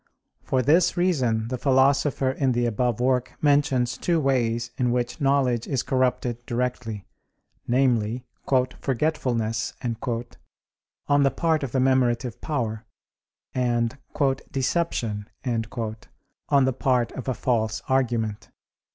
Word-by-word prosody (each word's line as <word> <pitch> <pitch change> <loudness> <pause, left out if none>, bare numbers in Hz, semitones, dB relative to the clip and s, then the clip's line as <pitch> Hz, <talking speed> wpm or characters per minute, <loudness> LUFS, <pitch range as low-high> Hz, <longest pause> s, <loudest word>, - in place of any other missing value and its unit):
For 130 -1 0
this 165 +7 +3
reason 125 -11 +1
the 130 -1 -3
Philosopher 135 0 +3
in 130 -1 0
the 120 0 +1
above 120 0 0
work 125 0 +1
mentions 140 -4 +2
two 170 -2 +1
ways 120 -4 0
in 125 -1 +1
which 120 +3 -2
knowledge 135 -4 +2
is 135 -3 -1
corrupted 125 -2 0
directly: 120 -4 -3 0.6
namely, 120 -2 +1 0.5
"forgetfulness" 120 -5 -1 1.3
on 145 0 +4
the 140 - +4
part 160 +1 +1
of 135 -4 -3
the - - 0
memorative 125 -2 +1
power, 115 -7 -2 0.7
and 120 -2 0 0.5
"deception" 125 -7 -1 0.2
on 115 +3 -2
the 130 - +1
part 125 -2 +1
of 130 - -7
a 130 - 0
false 110 -3 0
argument. 115 -5 0
125 Hz, 115 wpm, -25 LUFS, 115-135 Hz, 1.3 s, on